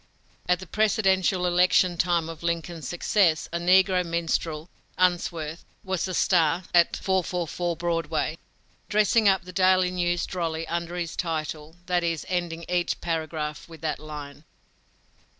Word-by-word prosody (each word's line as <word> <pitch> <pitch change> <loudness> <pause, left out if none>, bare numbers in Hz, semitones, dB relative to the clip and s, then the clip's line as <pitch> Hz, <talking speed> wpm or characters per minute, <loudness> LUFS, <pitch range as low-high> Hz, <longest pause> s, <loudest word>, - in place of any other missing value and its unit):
At 180 -1 +3
the 185 - -8
presidential 190 -2 +2
election 180 0 +3
time 170 -1 +1
of 165 -1 -8
Lincoln's 170 -3 -3
success, 175 -2 +2
a 170 - 0
negro 185 +1 +4
minstrel, 165 -2 -2 0.3
Unsworth, 170 -3 0 0.2
was 190 -1 -2
a 185 - -3
"star" 170 -1 +2
at 175 -1 +4
"444" 175 -2 -1
Broadway, 165 -2 -1 0.5
dressing 210 +1 +4
up 190 -1 +2
the 180 +1 -11
daily 185 0 +3
news 175 -1 0
drolly 165 -3 -3
under 170 +1 -3
this 170 -2 -3
title 155 -2 -4
that 180 -1 +1
is, 165 -3 -1
ending 170 -2 -2
each 175 -1 0
paragraph 160 -2 -3
with 165 -2 -12
that 155 -1 -2
line. 150 -1 -9
175 Hz, 135 wpm, -26 LUFS, 165-180 Hz, 0.5 s, negro